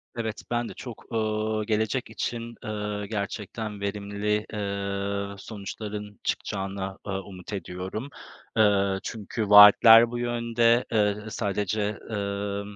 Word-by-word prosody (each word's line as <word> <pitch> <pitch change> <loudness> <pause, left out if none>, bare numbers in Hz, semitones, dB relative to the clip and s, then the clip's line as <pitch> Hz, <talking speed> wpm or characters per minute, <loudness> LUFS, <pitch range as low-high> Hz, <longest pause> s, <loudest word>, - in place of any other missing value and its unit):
Evet, 110 -2 -3
ben 120 0 0
de - - -8
çok, 120 -3 -9
eee, 110 -1 0
gelecek 110 +4 0
için, 115 -1 -4
eee, 105 -1 -3
gerçekten 105 0 -4
verimli, 105 +1 -1
eee, 100 0 -3
sonuçların 105 0 -7
çıkacağına, 95 0 -3
eee, - - -2
umut 95 0 -7
ediyorum. 95 +7 -5 0.5
Eee, 100 -2 +3
çünkü 110 -1 -4
vaatler 115 +3 +9
bu 120 - -3
yönde. 120 0 +2
Eee, 105 -2 +2
sadece, 105 0 -1 0.3
emm, 100 0 -3
105 Hz, 115 wpm, -26 LUFS, 100-110 Hz, 0.5 s, vaatler